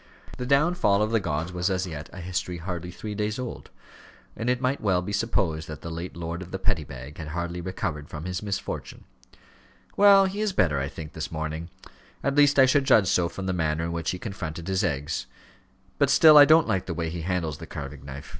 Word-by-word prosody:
The 125 - -3
downfall 140 - +3
of 110 - -1
the 115 - +3
gods 85 -1 -3
was 90 +2 0
as 95 0 0
yet 80 -4 -7
a 95 - -9
history 90 0 -3
hardly 90 0 -5
three 105 +4 -6
days 105 +1 -2
old, 125 -2 -6 0.7
and 115 - -2
it 125 0 +1
might 130 +2 0
well 95 -4 +1
be 100 - -5
supposed 95 -8 0
that 75 - -8
the 85 - -6
late 85 +2 -6
lord 85 +1 -4
of 90 - -8
the 95 - -4
Petty 95 -4 0
Bag 65 +2 -10
had 80 - -6
hardly 85 +2 -4
recovered 75 -5 -4
from 80 +1 -7
his 90 0 -3
misfortune. 100 -2 -5 0.9
"Well, 200 -1 +7
he 195 +2 -3
is 215 -3 0
better, 75 - +2
I 70 - -1
think, 75 +2 -9
this 80 - -5
morning; 80 +1 -4 0.5
at 140 - +1
least 145 0 +5
I 135 - +8
should 135 +1 +3
judge 100 -7 +5
so 90 -2 +2
from 95 - -6
the 95 - -1
manner 80 -2 0
in 85 - -2
which 85 -1 -2
he 90 - -2
confronted 85 -5 -6
his 95 -1 0
eggs. 75 +2 -2 0.7
But 140 -2 +4
still 155 +2 +8
I 145 -1 +11
don't 160 +2 +5
like 95 -2 -1
the 85 - -3
way 80 -1 -2
he 85 0 -5
handles 85 -3 -2
the - - -9
carving 70 0 -7
knife. 70 0 -8
90 Hz, 225 wpm, -26 LUFS, 80-110 Hz, 0.9 s, I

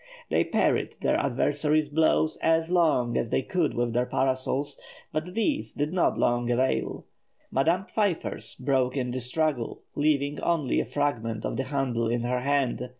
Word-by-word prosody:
They - - +3
parried - - +1
their - - +2
adversary's 145 +3 +1
blows 155 +1 +2
as 165 +1 +2
long 150 -9 +2
as 115 - -2
they 130 - +1
could 175 -2 0
with 120 -1 0
their 125 +1 +1
parasols, 135 +2 -1 0.3
but 155 +4 -3
these 285 +7 -1
did 150 +3 -1
not 185 - +2
long 120 0 +1
avail; 125 +2 0 0.5
Madame 165 +8 +2
Pfeiffer's 200 -6 -2
broke 130 -1 0
in 125 -2 -1
the 130 - -2
struggle, 130 0 -1
leaving 145 -1 +1
only 165 -6 +1
a - - 0
fragment 115 -4 -2
of - - -2
the 130 +3 -2
handle 130 -4 -1
in 120 0 0
her 125 +1 0
hand. 130 -2 0
140 Hz, 160 wpm, -27 LUFS, 125-155 Hz, 0.5 s, They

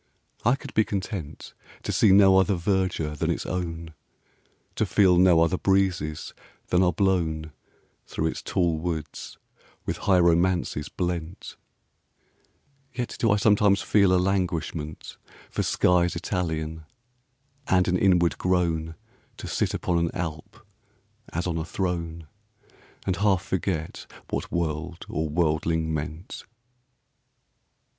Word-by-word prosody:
I 120 +3 +4
could - - -10
be 110 - +4
content 95 -6 -5 0.3
To - - -2
see 105 - +4
no 95 -1 +7
other 95 +1 +2
verdure 90 -4 -1
than - - -1
its - - -1
own; 85 -3 -4 0.8
To - - 0
feel 95 -4 +4
no 90 -3 +6
other 85 +2 +2
breezes 95 -6 0 0.4
than 90 - +3
are 90 -1 +4
blown 80 -4 0 0.6
Through 80 - -3
its 80 - -2
tall 85 -3 0
woods 80 -2 -5 0.5
with - - -2
high 95 -2 +2
romances 85 -3 +2
blent: 85 -1 -4 1.4
Yet 125 -1 -4
do 115 - +2
I 100 - +4
sometimes 105 -1 +3
feel 100 -3 +4
a 95 - +4
languishment 90 -5 -2 0.3
5 - - -32
For - - 0
skies 90 -1 +2
Italian, 80 -3 -3 0.8
and 90 -1 +3
an 90 - +2
inward 90 -4 +3
groan 85 -3 0 0.4
To - - -7
sit - - -1
upon 85 -1 0
an 85 0 +1
Alp 80 -4 -6 0.7
as 85 +2 -2
on 85 -2 -1
a - - -2
throne, 85 -2 -3 0.8
And 95 -2 0
half 100 -2 +2
forget 90 -4 -3 0.2
what - - -3
world 85 0 -3
or 80 0 -2
worldling 80 0 0
meant. 80 +4 -5
85 Hz, 130 wpm, -25 LUFS, 80-95 Hz, 1.4 s, no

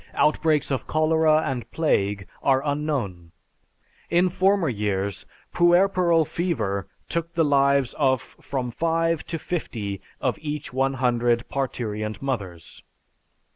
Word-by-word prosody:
Outbreaks 155 -1 +2
of 130 -4 -2
cholera 155 0 +3
and 120 -4 -3
plague 100 -11 0
are 135 0 +2
unknown. 135 - -2 0.8
In 175 +2 +3
former 190 0 +2
years, 100 -4 -2 0.3
puerperal 175 -1 +4
fever 135 - -2 0.2
took 170 0 -3
the 165 -1 +3
lives 140 -2 +3
of 130 -3 +2
from 130 0 -5
five 165 +2 0
to 165 - -3
fifty 110 - -4 0.2
of - - -1
each 150 -3 -5
one 135 +1 +1
hundred 120 -2 +1
parturient 110 -6 -3
mothers. 100 -11 -5
140 Hz, 115 wpm, -24 LUFS, 115-160 Hz, 0.8 s, puerperal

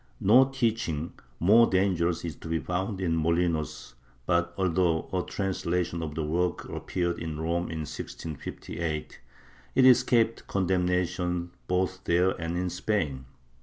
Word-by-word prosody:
^ - - -33 0.2
No 120 +7 +6
teaching 115 - -1 0.3
more 110 +7 +6
dangerous 90 -3 +1
is 80 -4 -4
to - - -10
be 80 0 0
found 95 +5 -2
in 85 -3 0
Molinos 80 -5 0 0.3
but, 85 +1 +1
although 90 -3 +1
a 90 - +1
translation 90 -3 -2
of 75 -2 -5
the 80 - -1
work 85 +3 -1
appeared 85 -2 -2
in 80 -2 -5
Rome 85 +2 -1
in 80 -1 -4
1658, 75 +1 -6 0.5
it 130 - +6
escaped 115 -2 +4
condemnation 90 -2 0 0.2
both 95 +1 0
there 90 +2 +3
and 85 +1 -2
in 90 0 -1
Spain. 80 -9 -1
90 Hz, 135 wpm, -28 LUFS, 80-95 Hz, 0.5 s, No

